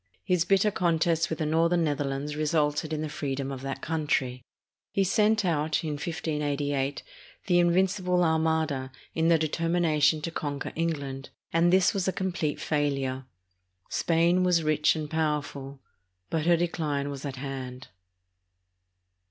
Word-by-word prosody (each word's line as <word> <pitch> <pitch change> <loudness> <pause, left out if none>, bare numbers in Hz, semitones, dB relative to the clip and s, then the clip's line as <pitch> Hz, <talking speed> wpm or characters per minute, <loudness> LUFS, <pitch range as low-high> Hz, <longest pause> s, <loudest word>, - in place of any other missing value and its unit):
His 180 -3 +1
bitter 195 +3 +3
contest 170 -2 +1
with 160 - -2
the 155 - -1
northern 165 +2 +2
Netherlands 145 -1 -2
resulted 150 0 0
in 155 0 -2
the - - -2
freedom 140 -2 -3
of 135 -1 -6
that 135 0 -5
country. 145 -5 -1 0.5
He 195 - +2
sent 215 +2 +2
out, 155 -2 0
in 155 - -2
1588, 145 -3 -2 0.4
the 175 -2 +3
"Invincible 180 +1 +2
Armada" 160 -4 +1 0.2
in 160 0 +1
the 165 -1 +5
deter 160 +1 -1
mination 155 -3 +3
to 165 - -3
conquer 145 -3 -4
England; 140 -5 -3 0.2
and 170 +1 +4
this 185 0 +4
was 195 -2 -1
a - - +3
complete 180 -6 -2
fail 145 -2 0
ure. 130 -1 -3 0.6
Spain 170 +2 +2
was 175 -2 +3
rich 155 0 +3
and 155 -1 -3
powerful, 145 -3 -2 0.5
but 160 0 0
her 170 -1 +5
decline 150 -4 -1
was 140 -1 -7
at 140 -2 -4
hand. 130 -1 -6
155 Hz, 145 wpm, -27 LUFS, 145-170 Hz, 0.6 s, the